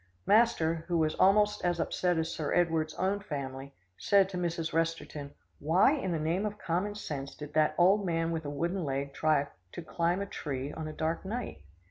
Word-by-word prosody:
Master, 170 -8 +3
who 175 -2 +1
was 155 -1 +2
almost 210 +2 +3
as 175 -1 +1
upset 180 +1 0
as 160 +1 -1
Sir 150 -2 -3
Edward's 160 -3 +1
own 190 +2 0
family, 140 -7 -6 0.2
said 195 -1 +4
to 185 - -5
Mrs. 170 -2 -2
Resterton, 165 -3 -2 0.2
"Why 175 - +4
in 260 -12 -1
the 165 - 0
name 165 +5 0
of 210 -1 -3
common 185 +4 -2
sense 140 -9 -5
did 150 -1 -9
that 155 0 +3
old 195 +4 +5
man 165 -2 0
with 165 -1 -2
a - - -3
wooden 170 +5 -2
leg 140 -1 -3
try 150 -2 +2 0.3
to - - -6
climb 170 +3 0
a 200 - -2
tree 140 -6 -5
on 160 -1 -5
a - - -5
dark 160 +2 -2
night?" 205 - -5
165 Hz, 195 wpm, -30 LUFS, 155-190 Hz, 0.3 s, old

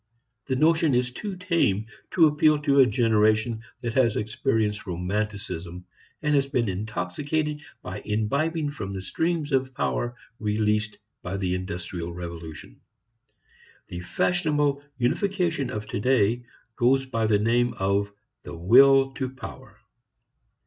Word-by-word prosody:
The 130 - 0
notion 155 0 +3
is 125 +1 +1
too 200 +9 -5
tame 170 - +1 0.3
to 170 - +7
appeal 150 0 +4
to 140 -2 +3
a 130 - +7
generation 110 -1 +2 0.2
that 120 -2 -3
has 120 -4 +3
experienced 105 -1 -1
romanticism 90 -1 -4 0.4
and 150 0 +2
has 140 -1 +3
been 125 -5 0
intoxicated 110 - -2 0.2
by 90 0 -6
imbibing 145 +9 0
from 100 -8 -6
the 95 - -4
streams 160 - -1
of 130 -1 0
power 120 0 -1 0.2
released 105 0 0 0.2
by 95 +2 -4
the 95 -2 -1
industrial 90 -2 -4
revolution. 85 -3 -8 1.1
The 90 - -5
fashionable 150 - +1 0.2
unification 170 +2 0
of 105 -4 -4
today 120 +1 +1 0.3
goes 135 +2 +3
by 115 -4 -1
the 105 -1 +4
name 120 +3 +1
of 100 +1 0 0.3
the 85 - -9
will 135 +9 +6
to 130 -2 -3
power. 130 0 -10
120 Hz, 130 wpm, -25 LUFS, 100-140 Hz, 1.1 s, to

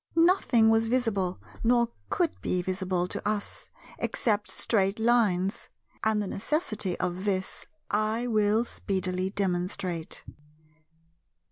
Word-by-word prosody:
Nothing 330 - +4
was 225 0 +3
visible, 220 -7 0 0.2
nor 235 0 +3 0.2
could 350 -5 0
be 180 -1 0
visible, 185 -1 -1
to - - -4
us, 210 -1 -3 0.3
except 210 -3 0
Straight 195 -2 +1
Lines; 215 -5 +2 0.3
and 220 -1 +2
the 210 - -1
necessity 215 - -1
of 180 +1 -2
this 190 -2 -2 0.2
I 215 +3 +1
will 215 -1 +3
speedily 185 -4 -2
demonstrate. 180 -3 -2
205 Hz, 110 wpm, -28 LUFS, 185-225 Hz, 0.3 s, Nothing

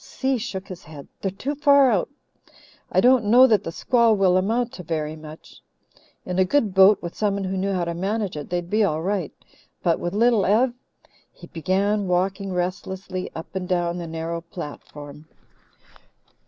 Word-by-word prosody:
Si 265 -2 -2
shook 190 -2 -5
his 180 -1 -9
head. 150 -2 -11
"They're 195 - -1
too 255 +10 -4
far 280 -2 +5
out. 200 -5 0 0.8
I - - +3
don't 250 -2 +4
know 245 +5 +7
that 215 -6 +3
the 165 - -5
squall 235 +4 +2
will 190 -3 +3
amount 230 +6 0
to 180 - -8
very 155 -2 -3
much. 155 0 -13 0.6
In 180 0 -2
a - - +6
good 210 0 +1
boat, 190 +1 +6
with 175 - -5
someone 200 -2 -1
who 190 0 -3
knew 195 +1 -1
how 180 -3 -1
to 170 - -3
manage 200 +2 -2
it, 150 -1 -7
they'd 175 -1 -2
be 215 +4 +2
all 160 -5 0
right. 190 -4 -2 0.5
But 170 -2 +2
with 175 +3 -3
Little 230 -1 +3
Ev 235 +5 +3 0.3
" - - -34
He - - -10
began 195 +5 -1
walking 190 +2 -1
restlessly 185 +1 -4
up 160 +4 -9
and 185 -1 -4
down 175 -1 0
the 170 - -6
narrow 165 +1 -4
platform. 150 -3 -10
190 Hz, 180 wpm, -23 LUFS, 170-210 Hz, 0.8 s, know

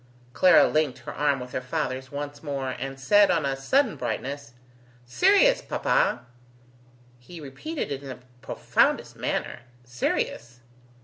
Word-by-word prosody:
Clara 185 - +6
linked 155 -4 0
her - - -7
arm 145 -2 +1
with 125 0 -8
her 130 - -3
father's 130 +1 -4
once 145 0 -6
more, 140 -3 -3
and 135 +2 -6
said, 205 +9 +5
on 165 -4 +1
a 135 -1 -1
sudden 220 - +1
brightness: 125 +2 -5 0.5
"Sirius, 405 - +4
papa!" - - 0 0.9
He 165 +8 -12
repeated 160 - -6
it 140 -1 -4
in 140 - -9
the 130 - -7 0.2
profoundest - - 0
manner: - - -3 0.2
"Sirius! 120 0 -3
140 Hz, 135 wpm, -25 LUFS, 130-170 Hz, 0.9 s, Clara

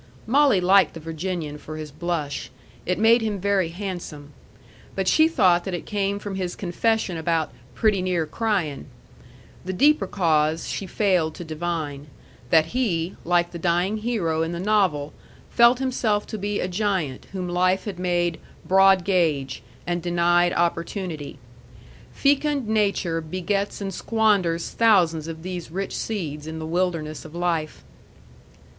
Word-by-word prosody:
Molly 270 -3 +4
liked 190 +1 +4
the - - -6
Virginian 160 -1 -4
for 155 +1 -8
his 155 -1 -7
blush. 155 -3 -3 0.4
It 180 - +1
made 230 +2 +5
him 215 -3 -2
very 195 -3 +1
handsome. 175 -6 -7 0.6
But 190 -1 -1
she 315 +9 +5
thought 180 - +3
that 190 -2 -2
it 175 - -6
came 200 -1 -1
from 205 -1 -6
his 185 -2 -3
confession 195 0 0
about 160 -2 0 0.2
"pretty 210 -4 +2
near 180 -3 0
crying." 175 -6 -2 0.8
The 185 - -4
deeper 285 0 +3
cause 160 -4 +1
she 195 - -4
failed 180 -5 +1
to - - -7
divine, 155 -3 -4 0.4
that 160 - +3
he, 185 -9 0
like 175 0 +1
the 170 - -7
dying 175 +5 +1
hero 205 -8 -1
in 165 +1 -1
the 170 - -4
novel, 185 -8 +1 0.4
felt 235 +1 +6
himself 245 -5 0
to 220 - -6
be 205 +1 -2
a - - -1
giant 185 -8 -2
whom 185 -2 -4
life 185 +3 +1
had 195 -4 -5
made 175 -2 0 0.3
"broad 195 0 +5
gauge," 155 -9 0 0.2
and 175 -1 -1
denied 175 0 +2
opportunity. 170 -2 -2 0.7
Fecund 285 -2 +1
nature 200 -6 +1
begets 185 +5 -2
and 195 -1 -3
squanders 200 -7 +1
thousands 175 -9 +3
of 160 0 -7
these 180 -2 -5
rich 195 +4 -4
seeds 155 -8 -4
in 160 0 -5
the 160 - -5
wilderness 165 -2 -2
of 160 +1 -11
life. 165 - -2
180 Hz, 150 wpm, -24 LUFS, 165-200 Hz, 0.8 s, felt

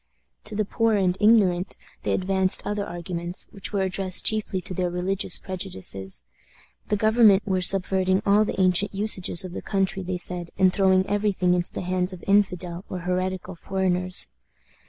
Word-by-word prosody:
To 215 0 -5
the 215 0 -1
poor 225 +1 0
and 185 -3 +1
ignorant 195 -4 +2 0.2
they - - -2
advanced 190 0 +3
other 205 -1 -3
arguments, 175 0 -4
which 195 - -7
were 200 -2 -1
addressed 190 0 0
chiefly 215 -3 +2
to 185 - -5
their 180 0 -2
religious 180 +2 +1
prejudices. 135 - -6 0.7
The 210 - +1
government 215 -2 +4
were 190 -3 -1
subverting 190 +1 +4
all 205 +2 +3
the 210 - -5
ancient 185 +2 +1
usages 190 -4 +2
of 180 - -9
the - - -6
country, 195 -1 -2
they 185 0 -4
said, 175 -1 -2
and 185 -1 +3
throwing 190 -1 +2
every 205 0 -1
thing 180 -1 0
into 175 -1 -1
the - - -6
hands 180 +1 0
of 180 - -11
infidel 185 -3 0
or 180 - -6
heretical 185 +1 -3
foreigners. 185 0 0
185 Hz, 170 wpm, -23 LUFS, 180-200 Hz, 0.7 s, government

